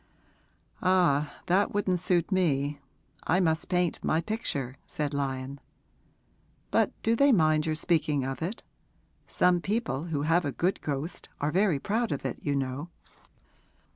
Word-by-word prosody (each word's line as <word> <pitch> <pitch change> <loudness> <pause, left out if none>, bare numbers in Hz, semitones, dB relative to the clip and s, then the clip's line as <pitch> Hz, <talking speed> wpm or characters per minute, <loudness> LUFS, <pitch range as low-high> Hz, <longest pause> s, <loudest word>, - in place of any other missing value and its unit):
'Ah, 175 -6 +3
that 195 +3 +2
wouldn't 185 -3 +1
suit 180 +1 +1
me; 145 -6 +1 0.5
I 180 - +3
must 160 -3 +1
paint 180 -2 0
my 160 - +2
picture,' 155 - -3
said 150 -1 -3
Lyon. 135 -1 -3 1.1
'But - - +3
do 225 +1 +3
they 280 +3 +5
mind 155 -6 +3
your 155 - 0
speaking 155 -3 +1
of 135 +3 -4
it? 185 +8 -4 0.6
Some 180 -1 +3
people 195 - -1
who 150 -4 -2
have 165 +3 +3
a 145 - -1
good 180 +7 -1
ghost 145 +3 -4
are 145 +1 0
very 185 -3 +3
proud 220 - -1
of 140 - -3
it, 130 - -3
you 145 -1 -1
know.' 135 +4 -3
160 Hz, 145 wpm, -28 LUFS, 140-185 Hz, 1.1 s, they